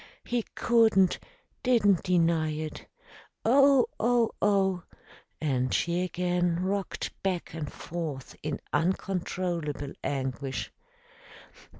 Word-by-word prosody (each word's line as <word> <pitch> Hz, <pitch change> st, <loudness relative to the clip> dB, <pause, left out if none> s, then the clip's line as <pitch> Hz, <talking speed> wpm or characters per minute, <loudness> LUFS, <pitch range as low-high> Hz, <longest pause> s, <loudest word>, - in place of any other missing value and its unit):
He 240 Hz, -1 st, 0 dB
couldn't, 220 Hz, -6 st, +4 dB, 0.4 s
didn't 215 Hz, -7 st, +4 dB
deny 165 Hz, -3 st, +2 dB
it. 155 Hz, 0 st, -5 dB, 0.6 s
Oh! 275 Hz, +2 st, +6 dB
Oh! 235 Hz, 0 st, +3 dB
Oh!" 195 Hz, -3 st, +2 dB, 0.6 s
And 130 Hz, -4 st, 0 dB
she 175 Hz, +1 st, +1 dB
again 180 Hz, -1 st, 0 dB
rocked 195 Hz, 0 st, -2 dB
back 185 Hz, -3 st, -2 dB
and 155 Hz, -3 st, -5 dB
forth 155 Hz, -6 st, -6 dB
in 150 Hz, -1 st, -3 dB
uncontrollable 170 Hz, -3 st, -1 dB
anguish. 135 Hz, -1 st, -3 dB
180 Hz, 90 wpm, -28 LUFS, 155-200 Hz, 0.6 s, Oh